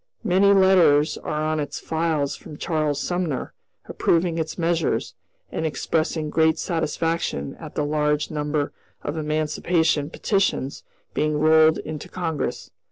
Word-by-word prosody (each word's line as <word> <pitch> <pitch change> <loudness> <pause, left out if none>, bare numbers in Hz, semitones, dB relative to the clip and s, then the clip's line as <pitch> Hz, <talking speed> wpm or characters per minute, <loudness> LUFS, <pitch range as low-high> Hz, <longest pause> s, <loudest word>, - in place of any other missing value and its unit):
Many 200 -1 +4
letters 180 -7 +5
are 150 0 -3
on 155 0 0
its 145 - -4
files 160 -3 -1
from 150 - -11
Charles 155 -4 -1
Sumner, 175 -7 -2 0.3
approving 165 0 +1
its 160 -1 -3
measures, 170 -1 0 0.4
and - - -3
expressing 155 +1 -1
great 160 +1 +3
satisfaction 165 - -2
at - - -9
the 150 - 0
large 150 0 0
number 150 -1 -1 0.3
of 145 - -3
emancipation 155 0 0
petitions 190 -9 0 0.3
being 150 0 0
rolled 155 +1 +5
into 155 -1 -6
Congress. 165 -5 -3
155 Hz, 125 wpm, -23 LUFS, 150-165 Hz, 0.4 s, letters